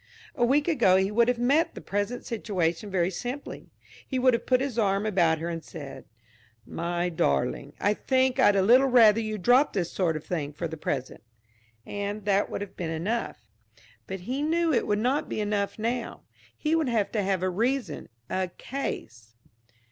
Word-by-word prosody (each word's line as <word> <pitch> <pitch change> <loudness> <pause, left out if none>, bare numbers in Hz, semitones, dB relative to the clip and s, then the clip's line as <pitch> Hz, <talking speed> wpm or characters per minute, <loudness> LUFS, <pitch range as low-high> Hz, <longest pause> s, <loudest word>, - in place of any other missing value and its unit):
A 250 - -1
week 285 +6 +3
ago 240 - +4
he 190 +1 +2
would 235 +2 +3
have 245 -1 +1
met 290 +8 +2
the - - -6
present 205 +5 -3
situation 200 -4 -2
very 185 -1 +1
simply. 245 +9 -6 0.4
He 260 - -2
would 255 0 +4
have 235 - -2
put 255 -1 +4
his 260 -3 -2
arm 200 -1 +1
about 175 -6 +2
her 165 +2 -4
and 165 -1 -4
said: 140 -4 -9 0.6
"My 175 +1 -2
darling, 70 - -1
I 205 - +2
think 260 +3 +1
I'd 205 - +5
a 195 - +3
little 250 +7 +6
rather 230 -4 +6
you 215 -1 -3
dropped 245 - +4
this 175 -4 -1
sort 170 -4 0
of 155 - -10
thing 150 -5 -3
for 170 +3 -4
the 160 - -7
present." 135 -4 -4 0.6
And 205 0 -4
that 200 0 +2
would - - -4
have 205 - -7
been 170 -3 -4
enough. 190 +9 -3 0.6
But 190 -1 -5
he 255 +9 -3
knew 325 +1 +1
it - - +1
would 205 - +1
not 255 +7 0
be - - -3
enough 205 -1 -1
now. 230 +2 -3 0.3
He 305 +1 -1
would 315 -5 +1
have 220 -4 0
to 215 - 0
have 190 -2 0
a 185 - +1
reason, 230 - -2 0.2
a 185 0 -1
case. 115 - -6
205 Hz, 190 wpm, -27 LUFS, 175-250 Hz, 0.6 s, little